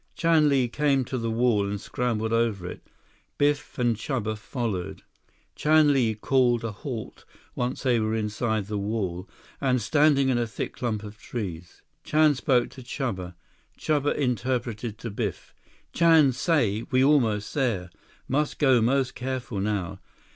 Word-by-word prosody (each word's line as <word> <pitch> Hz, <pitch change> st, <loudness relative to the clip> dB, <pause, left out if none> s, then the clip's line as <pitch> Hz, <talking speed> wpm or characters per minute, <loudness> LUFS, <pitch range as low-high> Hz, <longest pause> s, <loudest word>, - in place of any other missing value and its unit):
Chan 165 Hz, -3 st, +3 dB
Li 135 Hz, -3 st, +2 dB
came 135 Hz, 0 st, +1 dB
to 130 Hz, -, -5 dB
the 115 Hz, 0 st, -2 dB
wall 115 Hz, -3 st, +2 dB
and 100 Hz, 0 st, -3 dB
scrambled 110 Hz, -1 st, -2 dB
over 115 Hz, -5 st, 0 dB
it. 90 Hz, -, -7 dB, 0.6 s
Biff 145 Hz, 0 st, 0 dB
and 120 Hz, -3 st, +2 dB
Chuba 110 Hz, -1 st, -2 dB
followed. 105 Hz, -5 st, -4 dB, 0.5 s
Chan 155 Hz, -1 st, +4 dB
Li 115 Hz, -5 st, +2 dB
called 120 Hz, +1 st, +2 dB
a 115 Hz, -, -2 dB
halt 115 Hz, +2 st, -7 dB, 0.3 s
once 125 Hz, +1 st, -3 dB
they 125 Hz, -3 st, +3 dB
were 110 Hz, 0 st, 0 dB
inside 110 Hz, 0 st, -1 dB
the 105 Hz, 0 st, -3 dB
wall, 100 Hz, -3 st, -3 dB, 0.3 s
and 130 Hz, -2 st, +2 dB
standing 140 Hz, +3 st, +3 dB
in 125 Hz, -2 st, +2 dB
a 120 Hz, -, 0 dB
thick 110 Hz, -, -5 dB
clump 110 Hz, -4 st, -3 dB
of 105 Hz, +1 st, -10 dB
trees. 90 Hz, -8 st, -6 dB, 0.2 s
Chan 155 Hz, -1 st, +4 dB
spoke 130 Hz, -2 st, +1 dB
to 130 Hz, -, -11 dB
Chuba. 105 Hz, -9 st, -4 dB, 0.4 s
Chuba 145 Hz, -2 st, 0 dB
interpreted 120 Hz, -4 st, -2 dB
to 115 Hz, -1 st, -6 dB
Biff. 105 Hz, -3 st, -4 dB, 0.4 s
"Chan 165 Hz, -5 st, +5 dB
say 120 Hz, -, +1 dB
we 130 Hz, 0 st, +3 dB
almost 115 Hz, -8 st, +2 dB
there. 110 Hz, -, -1 dB, 0.4 s
Must 145 Hz, +3 st, 0 dB
go 130 Hz, -5 st, +4 dB
most 130 Hz, +3 st, +1 dB
careful 125 Hz, -4 st, -4 dB
now. 95 Hz, -2 st, -2 dB
120 Hz, 150 wpm, -26 LUFS, 105-135 Hz, 0.6 s, Chan